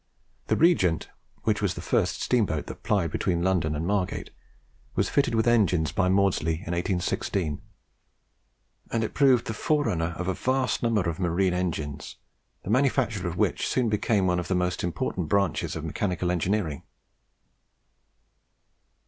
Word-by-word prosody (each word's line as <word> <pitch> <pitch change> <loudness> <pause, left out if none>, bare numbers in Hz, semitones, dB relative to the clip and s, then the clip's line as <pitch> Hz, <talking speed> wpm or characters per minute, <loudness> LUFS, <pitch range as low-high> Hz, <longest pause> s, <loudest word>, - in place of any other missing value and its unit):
The - - +2
'Regent,' 95 - +3 0.3
which - - +1
was - - 0
the - - -6
first - - 0
steamboat 105 -11 +1
that - - -9
plied 100 -7 0
between 85 +1 0
London 85 -5 +1
and 80 +2 -2
Margate, 95 -1 -1 0.6
was - - +1
fitted 140 -4 +1
with 110 - +2
engines 95 -10 +3
by 90 0 +1
Maudslay 95 -4 +2
in 85 +1 -5
1816; 90 -2 -1 1.3
and 115 - 0
it 110 - -3
proved 130 -4 +4
the 115 - -3
forerunner 90 - 0
of 90 - -3
a 95 - +1
vast 130 +3 0
number 110 -6 +1
of 85 +1 -3
marine 90 +1 +1
engines, 75 -5 -3 0.5
the 100 - -3
manufacture 125 -6 +1
of 85 0 -4
which - - +1
soon 125 -3 +1
became 105 -1 +1
one 90 -1 +2
of 90 - -4
the 95 - 0
most 90 0 -1
important 90 -1 -2
branches 100 -5 +1
of 80 0 -5
mechanical 90 +2 -1
engineering. 90 -4 -1
90 Hz, 150 wpm, -26 LUFS, 85-110 Hz, 1.3 s, proved